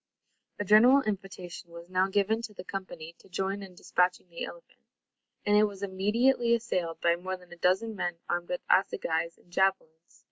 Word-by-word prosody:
A 205 - -3
general 245 +7 +7
invitation 190 -4 -5
was 170 0 -11
now 185 +1 +2
given 205 +3 +1
to 220 -3 -8
the - - -8
company 185 -4 -7
to - - -20
join 195 +2 -2
in 190 -2 -10
despatching 180 0 0
the 170 - -6
elephant; - - -13 0.7
and 205 - +4
it 210 +1 +6
was 200 -1 -6
immediately 235 +5 +2
assailed 180 -8 -2
by 170 0 +4
more 185 +2 -4
than 180 -1 -15
a - - -12
dozen 190 +6 +1
men 175 -3 -2
armed 175 0 -2
with 180 - -2
assegais 170 -3 +1
and 175 - -25
javelins. 170 -4 -1
190 Hz, 180 wpm, -29 LUFS, 175-210 Hz, 0.7 s, general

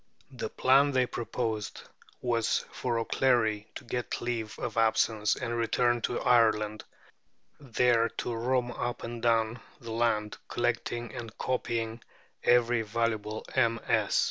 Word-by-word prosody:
The - - -5
plan 140 +2 +4
they 130 -1 +3
proposed 115 -3 -3 0.4
was 115 -2 +1
for 120 -2 -2
O'Clery 115 -3 +1
to - - -7
get 120 +1 -3
leave 115 -3 -3
of 120 - -4
absence 110 -1 +2
and 120 -2 -3
return 120 +1 +1
to 120 - -1
Ireland, 110 -3 +3 0.8
there 120 -3 +2
to 120 - -2
roam 125 +1 0
up 120 0 -4
and 115 0 -5
down 115 0 +2 0.2
the 115 -1 -8
land, 110 -2 0
collecting 120 0 -2
and 115 -1 -8
copying 115 -2 -2 0.4
every 120 -1 +4
valuable 110 -1 -2
MS. 115 -3 +2
115 Hz, 125 wpm, -29 LUFS, 110-120 Hz, 0.8 s, plan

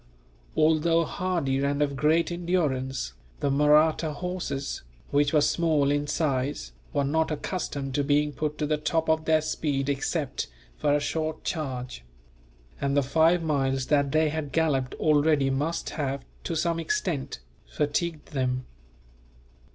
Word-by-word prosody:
Although 165 +2 +3
hardy 170 -7 -1
and 140 0 0
of 145 -1 +1
great 155 +5 +2
endurance, 145 - -1 0.3
the 140 - +1
Mahratta 150 +2 +4
horses, 175 -4 -4 0.3
which 145 0 +3
were 150 - +4
small 150 -1 +2
in 145 0 0
size, 135 - -1 0.2
were 140 - +1
not 160 +3 +1
accustomed 145 -3 -3
to 145 - +1
being 150 +1 +2
put 150 +2 -3
to 150 - -1
the 150 0 +1
top 160 +1 0
of 160 0 +2
their 155 -1 +4
speed 145 -3 -1
except 140 0 -1 0.3
for 145 - +1
a - - +3
short 155 +2 -2
charge; 130 - -4 0.8
and 140 0 +1
the 140 - +4
five 160 +5 +3
miles 135 -4 0
that 140 -1 +3
they 155 +1 +3
had 150 -2 -4
galloped 140 -6 +1
already 150 -2 +3
must 150 +5 -1
have, 140 -3 -3 0.2
to 165 - -2
some 165 +1 0
extent, 170 - -2 0.3
fatigued 155 +2 -2
them. 130 -2 -1
150 Hz, 145 wpm, -27 LUFS, 140-160 Hz, 0.8 s, Mahratta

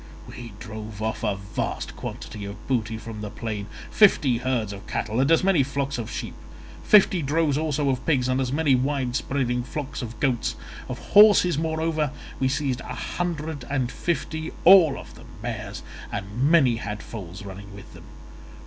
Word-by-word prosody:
We 115 -3 -9
drove 110 -1 -8
off 110 0 -3
a 105 -3 +1
vast 100 +2 -4
quantity 105 - -7
of 100 +1 -8
booty 115 -4 0
from 110 -1 -8
the 105 - -4
plain, 105 -2 -5 0.2
fifty 140 - +4
herds 120 -5 -1
of 100 +1 -10
cattle 110 +2 -2
and 135 +2 +3
as 165 - +5
many 190 -6 +4
flocks 140 0 -2
of 115 -1 -4
sheep; - - -5 0.5
fifty 195 -4 +5
droves 150 0 +1
also 150 -1 0
of 130 -1 -3
pigs, 130 -6 +2
and 130 +1 +1
as 125 -1 -1
many 145 -1 +2
wide 130 -1 0
spreading 125 -3 0
flocks 140 +3 -5
of 115 -3 -7
goats. 125 -3 0 0.3
Of - - -4 0.2
horses, 205 -6 +7
moreover, 160 -1 0 0.3
we 130 - +2
seized 135 -2 -1
a - - -6
hundred 160 -5 -3
and 130 -3 -1
fifty, 160 -1 -3
all 170 -6 +7
of - - -10
them - - -14 0.2
mares, - - -5 0.3
and 105 +8 -1
many 135 -8 +5
had 105 -2 -5
foals 95 -2 -8
running 100 +1 -9
with 100 - -12
them. - - -13
130 Hz, 175 wpm, -25 LUFS, 110-150 Hz, 0.5 s, horses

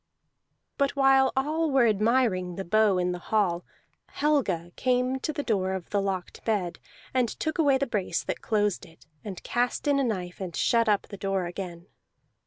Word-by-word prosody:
But 280 0 +1
while 270 -1 +5
all 310 +4 +1
were 265 -3 +4
admiring 215 -4 +1
the 195 - -5
bow 215 0 +3
in 180 0 +1
the 180 - -4
hall, 180 -3 0 0.4
Helga 220 - 0
came 255 +1 +1
to 310 - -2
the 290 -1 -4
door 190 -6 0
of 185 -2 -6
the 205 - +1
locked 190 -2 -4
bed, 185 -6 -1 0.3
and 250 -3 +2
took 315 +7 -3
away 285 -4 +4
the 275 - 0
brace 200 -8 -1
that - - -4
closed 210 -3 0
it, 165 -2 -16 0.2
and 195 -4 -7
cast 245 +4 -1
in 285 -1 +3
a - - +2
knife, 185 -6 -3
and 180 -3 -5
shut 230 -2 +2
up 205 -1 +3
the 200 - -10
door 195 -1 -1
again. 175 -1 -6
215 Hz, 185 wpm, -27 LUFS, 185-265 Hz, 0.4 s, while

